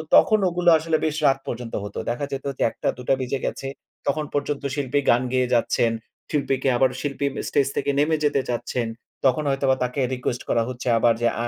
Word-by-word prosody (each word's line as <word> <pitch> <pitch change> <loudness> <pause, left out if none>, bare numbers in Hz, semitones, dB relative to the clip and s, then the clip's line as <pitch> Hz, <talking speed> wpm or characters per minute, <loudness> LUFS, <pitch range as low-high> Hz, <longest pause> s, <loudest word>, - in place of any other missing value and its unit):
তখন 215 -1 +6
ওগুলো 175 0 +2
আসলে 160 0 0
বেশ 155 -1 0
রাত 135 0 +4
পর্যন্ত 120 -1 -5
হতো। 105 - -7
দেখা 120 +4 -1
যেত 135 0 -4
যে - - +2
১ঃ০০-২ঃ০০ 125 +2 -1
বেজে 130 +1 -2
গেছে। 135 - -3 0.4
তখন 150 +2 +1
পর্যন্ত 145 0 -1
শিল্পী 145 0 0
গান 120 +1 +5
গেয়ে 130 -1 +2
যাচ্ছেন। 115 0 +2 0.4
শিল্পীকে 135 -2 +1
আবার 130 0 +4
শিল্পী 140 -1 -2
ম - - -12
স্টেজ 140 -2 +2
থেকে 140 0 0
নেমে 155 +2 +3
যেতে 145 -2 +2
চাচ্ছেন। 120 0 -2 0.4
তখন 130 +4 +3
হয়তোবা 135 -1 +2
তাকে 125 +3 -2
রিকোয়েস্ট 125 -1 -2
করা 115 - +3
হচ্ছে 125 0 -6
আবার 115 0 +4
যে 120 - +4 0.2
আ - - 0
135 Hz, 195 wpm, -24 LUFS, 125-145 Hz, 0.4 s, তখন